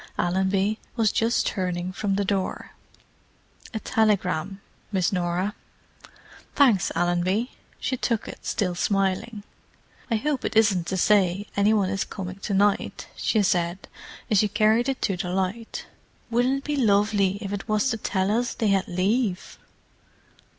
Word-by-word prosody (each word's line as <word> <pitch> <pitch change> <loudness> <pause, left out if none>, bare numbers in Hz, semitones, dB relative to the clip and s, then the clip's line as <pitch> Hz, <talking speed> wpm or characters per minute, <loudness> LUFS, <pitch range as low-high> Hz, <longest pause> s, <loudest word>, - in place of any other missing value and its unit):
Allenby 190 +4 +1 0.2
was 225 -3 +2
just 230 +2 +1
turning 180 -2 -2
from 195 0 -1
the 200 0 0
door. 190 -1 -2 1.0
"A 220 - -3
telegram, 195 -5 0 0.3
Miss 190 -1 +1
Norah." 180 +2 -1 1.0
"Thanks, 240 -10 +4
Allenby." 175 +7 +1 0.3
She 260 - -2
took 230 -2 -1
it, - - -9
still 185 -5 -1
smiling. 195 +3 -1 0.7
"I 230 - +2
hope 275 +3 -1
it - - -3
isn't 200 -6 +3
to 190 - -1
say 195 0 +3
any 200 +1 +3
one 200 -3 +2
is 195 -1 0
coming 185 -1 -7
to 200 +1 -4
night," 205 +1 +1
she 215 -2 +1
said, 175 0 0 0.4
as 210 - +5
she 210 - +3
carried 220 +4 +2
it 270 - -3
to 195 -4 0
the 175 0 -3
light. 190 +5 -3 0.5
"Wouldn't 245 +3 +2
it 275 - -7
be 295 -1 -2
lovely 205 -4 +2
if 200 -2 -5
it 205 +2 -5
was 215 +4 +2
to 225 - -1
tell 190 -2 0
us 240 +3 0
they 220 - 0
had 195 -1 +2
leave!" 190 +2 -1
200 Hz, 150 wpm, -25 LUFS, 185-220 Hz, 1.0 s, as